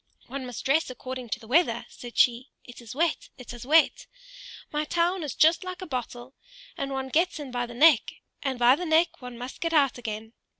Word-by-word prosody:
"One 260 Hz, 0 st, -6 dB
must 245 Hz, -, -7 dB
dress 295 Hz, +3 st, +2 dB
according 255 Hz, -1 st, -7 dB
to 220 Hz, -, -2 dB
the 225 Hz, -, -14 dB
weather," 245 Hz, -3 st, +2 dB
said 240 Hz, -1 st, -11 dB
she. 245 Hz, +2 st, +3 dB
"It 245 Hz, 0 st, -12 dB
is 235 Hz, +1 st, -10 dB
wet; 330 Hz, +2 st, 0 dB
it 250 Hz, -2 st, -9 dB
is 240 Hz, +1 st, -10 dB
wet. 315 Hz, +2 st, +4 dB, 0.6 s
My 300 Hz, 0 st, -1 dB
town 345 Hz, +4 st, 0 dB
is 295 Hz, -3 st, -4 dB
just 325 Hz, +4 st, +4 dB
like 365 Hz, -1 st, -6 dB
a 370 Hz, -, -6 dB
bottle; 250 Hz, -3 st, -6 dB, 0.4 s
and 275 Hz, -, -3 dB
one 265 Hz, 0 st, -3 dB
gets 330 Hz, +4 st, +1 dB
in 280 Hz, -3 st, -7 dB
by 245 Hz, -1 st, -2 dB
the 240 Hz, -, -10 dB
neck, 295 Hz, -2 st, +5 dB, 0.3 s
and 265 Hz, -3 st, -2 dB
by 245 Hz, +2 st, +6 dB
the 360 Hz, -, -5 dB
neck 320 Hz, -1 st, +2 dB
one 250 Hz, -1 st, -8 dB
must 250 Hz, +2 st, -8 dB
get 335 Hz, -1 st, -1 dB
out 275 Hz, -5 st, +3 dB
again! 220 Hz, -1 st, -6 dB
260 Hz, 215 wpm, -27 LUFS, 245-315 Hz, 0.6 s, by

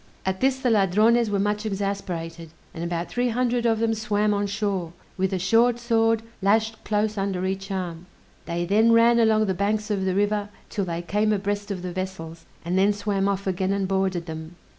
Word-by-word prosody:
At 190 Hz, 0 st, -1 dB
this 265 Hz, 0 st, +3 dB
the 260 Hz, -2 st, 0 dB
Ladrones 215 Hz, +3 st, +3 dB
were 205 Hz, -, 0 dB
much 210 Hz, +1 st, 0 dB
exasperated, 185 Hz, -5 st, -4 dB, 0.2 s
and 165 Hz, -, -5 dB
about 170 Hz, 0 st, -3 dB
three 245 Hz, 0 st, 0 dB
hundred 240 Hz, 0 st, +1 dB
of 225 Hz, -1 st, +2 dB
them 225 Hz, 0 st, +1 dB
swam 210 Hz, -1 st, 0 dB
on 205 Hz, 0 st, 0 dB
shore, 195 Hz, -4 st, -2 dB, 0.2 s
with 190 Hz, 0 st, 0 dB
a 190 Hz, -, 0 dB
short 230 Hz, +6 st, +3 dB
sword 225 Hz, -1 st, +1 dB, 0.2 s
lashed 220 Hz, +2 st, +1 dB
close 210 Hz, 0 st, 0 dB
under 190 Hz, -2 st, -1 dB
each 195 Hz, +1 st, -3 dB
arm; 180 Hz, -3 st, -4 dB, 0.4 s
they 170 Hz, +1 st, -2 dB
then 220 Hz, +5 st, +4 dB
ran 235 Hz, +1 st, +5 dB
along 220 Hz, -1 st, +4 dB
the 190 Hz, -, 0 dB
banks 210 Hz, +3 st, -1 dB
of 195 Hz, -2 st, 0 dB
the 185 Hz, -1 st, 0 dB
river 205 Hz, 0 st, 0 dB, 0.2 s
'till 200 Hz, -, -1 dB
they 170 Hz, -1 st, -4 dB
came 210 Hz, +4 st, +1 dB
abreast 205 Hz, 0 st, -2 dB
of 185 Hz, -3 st, -4 dB
the 180 Hz, -1 st, -4 dB
vessels, 180 Hz, -3 st, -6 dB, 0.2 s
and 180 Hz, +2 st, +1 dB
then 200 Hz, +2 st, +4 dB
swam 200 Hz, -1 st, -1 dB
off 200 Hz, 0 st, -1 dB
again 190 Hz, 0 st, 0 dB
and 200 Hz, -1 st, -1 dB
boarded 190 Hz, -3 st, 0 dB
them. 160 Hz, +1 st, -7 dB
200 Hz, 200 wpm, -24 LUFS, 185-215 Hz, 0.4 s, ran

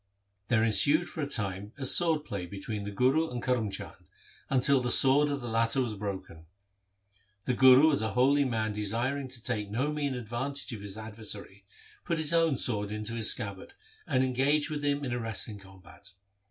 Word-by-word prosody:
There 115 Hz, -2 st, +2 dB
ensued 145 Hz, +9 st, +4 dB
for 160 Hz, -, -7 dB
a 140 Hz, -, -2 dB
time 100 Hz, -4 st, -3 dB
a 135 Hz, -, -3 dB
sword 160 Hz, +1 st, +3 dB
play 95 Hz, -3 st, -6 dB
between 100 Hz, +2 st, -6 dB
the 105 Hz, -, -5 dB
Guru 130 Hz, +10 st, +1 dB
and 125 Hz, -, -5 dB
Karm 120 Hz, -4 st, -1 dB
Chand, 95 Hz, -, -9 dB, 0.4 s
until 135 Hz, 0 st, +3 dB
the 125 Hz, -, -2 dB
sword 135 Hz, +4 st, +6 dB
of 140 Hz, -1 st, -3 dB
the 120 Hz, -, -6 dB
latter 115 Hz, +3 st, +1 dB
was 120 Hz, -4 st, -1 dB
broken. 95 Hz, -6 st, -7 dB, 1.0 s
The 125 Hz, -, 0 dB
Guru 130 Hz, +4 st, +6 dB
as 140 Hz, -, 0 dB
a 110 Hz, -2 st, -3 dB
holy 140 Hz, +3 st, +3 dB
man 110 Hz, -4 st, -2 dB
desiring 120 Hz, +7 st, -1 dB
to 125 Hz, -3 st, -8 dB
take 105 Hz, -5 st, -3 dB
no 130 Hz, +8 st, -2 dB
mean 145 Hz, -3 st, -2 dB
advantage 125 Hz, +4 st, -4 dB
of 105 Hz, -, -8 dB
his 100 Hz, 0 st, -8 dB
adversary, 105 Hz, -2 st, -7 dB, 0.4 s
put 170 Hz, -2 st, -2 dB
his 160 Hz, 0 st, -1 dB
own 165 Hz, -5 st, +2 dB
sword 105 Hz, -5 st, -1 dB
into 105 Hz, +2 st, -4 dB
his 115 Hz, -2 st, +4 dB
scabbard, 100 Hz, -5 st, -2 dB, 0.3 s
and 130 Hz, -2 st, +1 dB
engaged 135 Hz, +4 st, +1 dB
with 150 Hz, -1 st, -4 dB
him 145 Hz, 0 st, -1 dB
in 125 Hz, -, -4 dB
a 120 Hz, -, -2 dB
wrestling 110 Hz, -2 st, -2 dB
combat. 95 Hz, 0 st, -14 dB
120 Hz, 190 wpm, -28 LUFS, 105-140 Hz, 1.0 s, sword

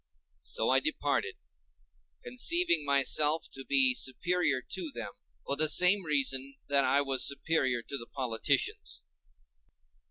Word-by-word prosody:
So -, -, -2 dB
I -, -, +4 dB
departed, -, -, -2 dB, 0.9 s
conceiving 250 Hz, -, +2 dB
myself 145 Hz, +3 st, +2 dB
to 135 Hz, -, -8 dB
be 135 Hz, -2 st, +3 dB
superior 145 Hz, +3 st, 0 dB
to 165 Hz, +5 st, -7 dB
them 115 Hz, -4 st, -7 dB, 0.3 s
for 140 Hz, -, -2 dB
the 155 Hz, +1 st, +2 dB
same 180 Hz, +3 st, +4 dB
reason 140 Hz, -2 st, -1 dB
that 140 Hz, -1 st, +3 dB
I 140 Hz, +1 st, +3 dB
was 135 Hz, -1 st, 0 dB
superior 140 Hz, -4 st, 0 dB
to 140 Hz, -, -6 dB
the 115 Hz, -, -11 dB
politicians. 125 Hz, -5 st, -3 dB
140 Hz, 125 wpm, -29 LUFS, 130-160 Hz, 0.9 s, I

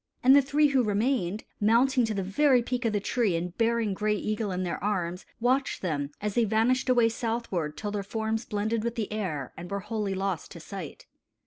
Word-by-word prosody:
And 260 Hz, +2 st, +8 dB
the 285 Hz, -, +8 dB
three 290 Hz, +2 st, +3 dB
who 270 Hz, -2 st, +3 dB
remained, 215 Hz, -2 st, 0 dB, 0.2 s
mounting 240 Hz, +4 st, +4 dB
to 220 Hz, -1 st, -2 dB
the 195 Hz, -, -1 dB
very 250 Hz, +6 st, +3 dB
peak 245 Hz, 0 st, -2 dB
of 225 Hz, -, +1 dB
the 205 Hz, -, +2 dB
tree 205 Hz, -2 st, 0 dB
and 175 Hz, +2 st, -3 dB
bearing 230 Hz, -2 st, +2 dB
Gray 210 Hz, +2 st, 0 dB
Eagle 215 Hz, +1 st, -2 dB
in 185 Hz, 0 st, -2 dB
their 175 Hz, 0 st, -3 dB
arms, 180 Hz, -3 st, -2 dB
watched 255 Hz, +1 st, +1 dB
them, 145 Hz, -5 st, -1 dB
as 210 Hz, 0 st, -2 dB
they 240 Hz, -, +3 dB
vanished 225 Hz, +5 st, +2 dB
away 240 Hz, -2 st, +5 dB
southward, 225 Hz, -9 st, -2 dB
till 205 Hz, -1 st, -3 dB
their 205 Hz, -1 st, -2 dB
forms 220 Hz, +2 st, -2 dB
blended 215 Hz, 0 st, -1 dB
with 235 Hz, 0 st, -2 dB
the 215 Hz, -2 st, -3 dB
air 160 Hz, -, -3 dB
and 175 Hz, +1 st, -8 dB
were 200 Hz, 0 st, -3 dB
wholly 210 Hz, -2 st, -2 dB
lost 190 Hz, -3 st, -2 dB
to 170 Hz, -, -9 dB
sight. 175 Hz, -1 st, -8 dB
215 Hz, 210 wpm, -28 LUFS, 195-235 Hz, 0.2 s, And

